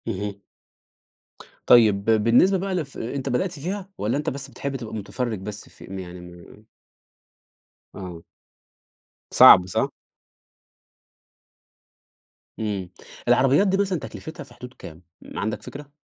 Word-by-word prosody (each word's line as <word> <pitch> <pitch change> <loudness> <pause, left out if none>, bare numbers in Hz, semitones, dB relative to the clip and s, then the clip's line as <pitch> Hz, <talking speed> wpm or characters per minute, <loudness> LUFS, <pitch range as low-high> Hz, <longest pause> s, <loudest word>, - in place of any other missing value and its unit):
اهم. 100 -1 -4 1.3
طيب، 105 -5 +6
بالنسبة 115 - +4
بقى 190 +1 -2
لف 150 -6 -4
أنت 135 +4 -4
بدأت 150 +9 0
فيها 190 +5 -4
والَّا 110 +6 -1
أنت 150 - -1
بس 135 0 -6
بتحب 140 -1 -5
تبقى 115 -4 -6
مُتفرِّج 110 +1 -3
بس 100 +2 -8
في - - -16
يعني 90 -2 -8
م 90 +4 -14 1.3
آه. 90 -4 -8 1.1
صعب، 90 - +9
صح؟ 95 - 0 2.7
إمم 100 -4 -3 0.4
العربيات 135 +10 +4
دي 195 0 +2
مثلًا 195 -3 0
تكلفتها 160 +1 -8
في 135 -3 -16
حدود 125 +1 -11
كام 80 -6 -12 0.2
ما - - -7
عندك 110 +1 -2
فكرة؟ 145 0 -10
120 Hz, 120 wpm, -24 LUFS, 100-145 Hz, 2.7 s, صعب